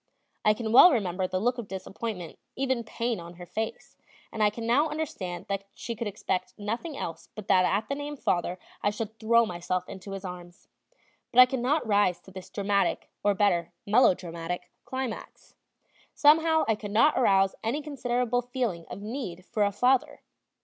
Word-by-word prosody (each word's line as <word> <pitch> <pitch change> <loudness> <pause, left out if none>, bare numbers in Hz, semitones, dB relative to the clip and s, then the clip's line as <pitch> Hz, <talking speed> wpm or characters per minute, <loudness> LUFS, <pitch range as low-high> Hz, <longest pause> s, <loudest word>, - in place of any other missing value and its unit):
I 210 0 +4
can 220 -1 -3
well 350 +9 +9
remember 190 - 0
the 185 - -1
look 245 +4 0
of 230 - -6
disappointment, 190 -1 -6 0.2
even 260 -3 0
pain, 230 0 -2
on 170 +1 -10
her 175 +1 -10
face; 220 +5 -5 0.3
and 220 - -4
I 210 - +5
can 225 +2 -6
now 280 +7 +3
understand 190 - -4
that 195 0 -3
she 235 - -5
could 225 0 -3
expect 190 -2 -3
nothing 230 +9 -4
else 165 - -6
but 215 -2 -8
that 185 -1 +5
at 200 +5 0
the - - -2
name 290 +1 -5
"father" 175 -5 0 0.2
I - - +2
should 220 +1 -5
throw 230 +1 +4
myself 180 -1 -3
into 195 +1 -8
his 195 0 -6
arms. 175 -1 -9 0.6
But 250 - +3
I 250 - +12
could 255 0 -3
not 270 +4 +1
rise 205 -4 +2
to 190 - -15
this 185 -1 -10
dramatic, 200 -1 0
or, 205 -1 +3
better, 175 -5 +1
melodramatic, 180 -6 +1
climax. 260 -3 -6 0.6
Somehow 320 +2 +5
I 225 - +4
could 210 -1 -6
not 230 +9 +4
arouse 195 -5 +4
any 260 +7 -1
considerable 245 -4 -1
feeling 240 -9 -3
of 200 - -7
need 210 -6 -5
for 210 - 0
a 200 - +2
father. 255 +7 +1
215 Hz, 180 wpm, -28 LUFS, 185-245 Hz, 0.6 s, I